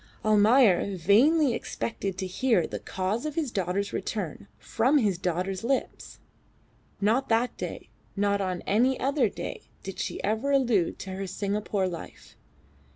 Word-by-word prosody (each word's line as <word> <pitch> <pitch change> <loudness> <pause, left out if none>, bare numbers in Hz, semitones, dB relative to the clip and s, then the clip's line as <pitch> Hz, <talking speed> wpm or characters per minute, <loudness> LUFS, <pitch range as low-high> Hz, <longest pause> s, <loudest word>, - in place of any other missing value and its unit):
Almayer 210 -2 +4
vainly 250 - +4
expected 200 -5 -4
to 190 - -3
hear 220 +2 +2
of - - -5
the - - -3
cause 190 +5 -2
of 305 -1 -4
his 305 -7 -1
daughter's 195 0 -2
return 210 +1 -4
from 255 +6 +1
his 205 -9 +1
daughter's 185 +2 -2
lips. 265 +3 -2 0.8
Not 230 +7 +1
that 235 +2 +1
day, - - -7 0.2
not 200 0 +1
on 185 -2 -2
any 250 +6 +2
other 270 -4 +2
day - - -7
did 195 -1 -7
she - - -3
ever 220 +6 0
allude 245 -11 +2
to 190 - -6
her 190 +1 -4
Singapore 200 0 -1
life. 170 -2 -9
210 Hz, 150 wpm, -27 LUFS, 190-245 Hz, 0.8 s, Almayer